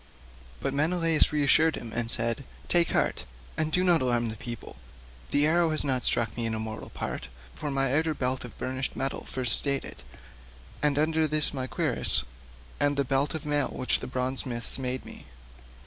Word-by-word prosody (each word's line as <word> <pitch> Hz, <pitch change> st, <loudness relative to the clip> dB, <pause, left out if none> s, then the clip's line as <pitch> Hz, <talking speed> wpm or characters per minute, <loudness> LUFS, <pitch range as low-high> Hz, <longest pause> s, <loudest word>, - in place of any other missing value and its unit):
But 135 Hz, -, -1 dB
Menelaus 165 Hz, +2 st, +2 dB
reassured 150 Hz, +2 st, +3 dB
him 115 Hz, -2 st, -7 dB
and 115 Hz, 0 st, -1 dB
said, 115 Hz, +3 st, 0 dB, 0.2 s
"Take 170 Hz, -1 st, +4 dB
heart, -, -, 0 dB, 0.3 s
and 155 Hz, 0 st, -1 dB
do 180 Hz, +3 st, +2 dB
not 175 Hz, -3 st, +4 dB
alarm 120 Hz, -2 st, +1 dB
the 110 Hz, -, -6 dB
people; 120 Hz, -, -8 dB, 0.5 s
the 145 Hz, +1 st, +3 dB
arrow 165 Hz, +1 st, +3 dB
has 155 Hz, -1 st, 0 dB
not 130 Hz, -3 st, 0 dB
struck 115 Hz, -2 st, +2 dB
me 115 Hz, -1 st, -1 dB
in 110 Hz, -, -1 dB
a -, -, -3 dB
mortal 110 Hz, 0 st, -6 dB
part, 60 Hz, -, -5 dB, 0.3 s
for 150 Hz, -, -4 dB
my 135 Hz, -1 st, +1 dB
outer 160 Hz, 0 st, +1 dB
belt 130 Hz, 0 st, -1 dB
of 125 Hz, -, -11 dB
burnished 130 Hz, +1 st, -3 dB
metal 135 Hz, 0 st, -3 dB
first 125 Hz, -3 st, +4 dB
stayed 140 Hz, -1 st, 0 dB
it, -, -, -8 dB, 0.8 s
and 145 Hz, -1 st, +3 dB
under 160 Hz, +1 st, +2 dB
this 155 Hz, 0 st, +3 dB
my 130 Hz, -2 st, -3 dB
cuirass -, -, +1 dB, 0.6 s
and 145 Hz, 0 st, +1 dB
the 140 Hz, -, +1 dB
belt 135 Hz, +4 st, 0 dB
of 155 Hz, -, -5 dB
mail 145 Hz, -2 st, +1 dB
which 130 Hz, -, 0 dB
the -, -, -7 dB
bronze 130 Hz, 0 st, -2 dB
smiths 120 Hz, 0 st, -2 dB
made 130 Hz, 0 st, -3 dB
me." -, -, -10 dB
135 Hz, 190 wpm, -27 LUFS, 125-155 Hz, 0.8 s, Take